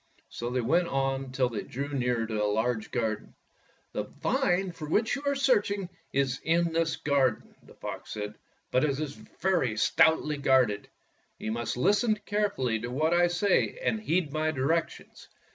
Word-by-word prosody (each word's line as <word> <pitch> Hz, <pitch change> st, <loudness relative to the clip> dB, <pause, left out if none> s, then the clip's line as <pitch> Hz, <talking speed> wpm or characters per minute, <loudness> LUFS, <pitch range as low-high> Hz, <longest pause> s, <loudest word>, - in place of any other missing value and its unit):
'' -, -, -35 dB
So 120 Hz, -, -4 dB
they 125 Hz, 0 st, 0 dB
went 170 Hz, +9 st, +2 dB
on 135 Hz, -2 st, -1 dB
till 130 Hz, -1 st, +1 dB
they 115 Hz, -3 st, -3 dB
drew 140 Hz, +3 st, -5 dB
near 125 Hz, -4 st, 0 dB
to 110 Hz, -2 st, -1 dB
a -, -, +2 dB
large 110 Hz, +1 st, 0 dB
garden. 110 Hz, -3 st, -2 dB, 0.6 s
''The -, -, -3 dB
vine 180 Hz, +1 st, +1 dB
for 155 Hz, -3 st, -8 dB
which 220 Hz, +7 st, +2 dB
you 275 Hz, -, -5 dB
are 280 Hz, -, +2 dB
searching 205 Hz, -8 st, +1 dB, 0.2 s
is 135 Hz, -1 st, 0 dB
in 165 Hz, +1 st, +2 dB
this 165 Hz, -1 st, +1 dB
garden," 135 Hz, -5 st, 0 dB
the -, -, -18 dB
fox -, -, -7 dB
said, 105 Hz, 0 st, -4 dB, 0.2 s
" -, -, -43 dB
but 130 Hz, -, +3 dB
it 140 Hz, -2 st, +1 dB
is 150 Hz, -2 st, -3 dB
very 165 Hz, -, -1 dB
stoutly 150 Hz, +6 st, +3 dB
guarded. 130 Hz, -7 st, +2 dB, 0.5 s
You 110 Hz, -, -4 dB
must 115 Hz, +1 st, -2 dB
listen 210 Hz, -, +3 dB
carefully 205 Hz, -, -1 dB
to 120 Hz, +3 st, -5 dB
what 155 Hz, +6 st, +1 dB
I 175 Hz, 0 st, +5 dB
say 175 Hz, -, +1 dB
and 220 Hz, -, 0 dB
heed 170 Hz, -7 st, 0 dB
my 155 Hz, 0 st, +1 dB
directions. 155 Hz, +3 st, -2 dB
140 Hz, 180 wpm, -28 LUFS, 125-175 Hz, 0.6 s, I